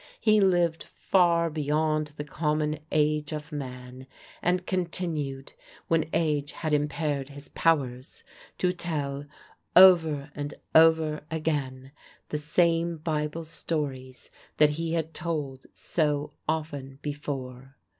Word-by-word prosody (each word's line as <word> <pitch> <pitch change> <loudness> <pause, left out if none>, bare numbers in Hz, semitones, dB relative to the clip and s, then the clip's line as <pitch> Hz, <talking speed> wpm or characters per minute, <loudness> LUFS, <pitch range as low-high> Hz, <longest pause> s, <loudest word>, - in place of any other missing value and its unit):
He 215 -1 +4
lived 175 -4 +2
far 170 -3 +2
beyond 155 0 0
the 145 - -3
common 150 0 -1
age 150 0 +1
of 150 +1 -6
man, 130 -2 -7 0.3
and 180 +1 +1
continued, 165 -7 -3 0.4
when 165 -1 +2
age 150 -2 0
had 155 -2 -3
impaired 145 -1 -1
his 145 0 -10
powers, 135 -5 0 0.3
to 180 -1 +1
tell 145 -5 -3 0.5
over 160 -6 +6
and 145 0 -5 0.2
over 160 -1 +5
again 140 -5 -2 0.4
the 150 - -1
same 165 +2 +2
Bible 155 0 -2
stories 140 -5 -5 0.3
that 150 -1 +5
he 165 +2 -3
had 160 -1 -2
told 150 -5 -4
so 150 -3 -1 0.2
often 145 -4 -3
before. 135 -3 -5
150 Hz, 115 wpm, -27 LUFS, 145-165 Hz, 0.5 s, over